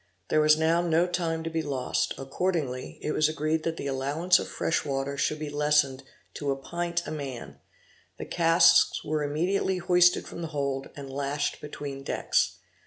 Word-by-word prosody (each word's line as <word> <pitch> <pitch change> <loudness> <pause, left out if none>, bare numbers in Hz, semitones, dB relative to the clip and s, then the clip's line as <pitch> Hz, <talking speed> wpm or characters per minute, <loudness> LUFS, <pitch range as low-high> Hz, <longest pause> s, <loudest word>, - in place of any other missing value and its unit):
There 155 - +3
was 155 0 +5
now 165 +2 +2
no 170 0 +2
time 170 -2 -2
to 165 - -3
be 165 0 -1
lost; 140 -4 -1
accordingly 135 -2 -2
it 150 - -1
was 155 0 +2
agreed 155 +1 -1
that 165 0 -3
the - - -5
allowance 145 +7 +2
of - - -4
fresh 165 - -1
water 135 0 -2
should 145 +2 0
be 150 -1 -5
lessened 145 -2 +2 0.3
to 145 - -4
a 135 - +1
pint 170 +5 -3
a - - -5
man; 125 - -6 0.6
the - - -6
casks 165 -1 +4
were 155 0 -1
immediately 175 +6 0
hoisted 180 0 +3
from 170 - -8
the 165 - -3
hold, 135 -1 -2
and 135 -2 -8
lashed 140 +1 -2
between 145 -2 -6
decks. 135 - 0
150 Hz, 175 wpm, -27 LUFS, 140-165 Hz, 0.6 s, was